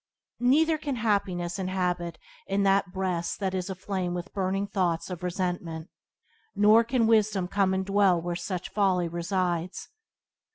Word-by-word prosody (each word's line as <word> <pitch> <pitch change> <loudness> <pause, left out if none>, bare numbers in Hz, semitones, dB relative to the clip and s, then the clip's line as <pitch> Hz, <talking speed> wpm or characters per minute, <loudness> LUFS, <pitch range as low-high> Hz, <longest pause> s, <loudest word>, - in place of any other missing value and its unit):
Neither 310 +6 +3
can 285 -3 -3
happiness 200 -6 -1
inhabit 180 -3 -2 0.3
in 200 +1 +1
that 195 -1 +2
breast 185 -3 -2
that 190 -2 -1
is 185 0 -2
aflame 185 -1 -3
with 175 +2 -6
burning 195 0 -1
thoughts 180 -4 -1
of 180 - -6
resentment. 175 -3 -3 0.7
Nor 215 +3 +6
can 235 0 +1
wisdom 215 -4 +2
come 195 0 +1
and 190 0 -1
dwell 195 -3 +3
where 175 +1 -3
such 180 +1 -4
folly 185 -4 +1
resides. 175 0 -2
190 Hz, 140 wpm, -27 LUFS, 175-200 Hz, 0.7 s, Nor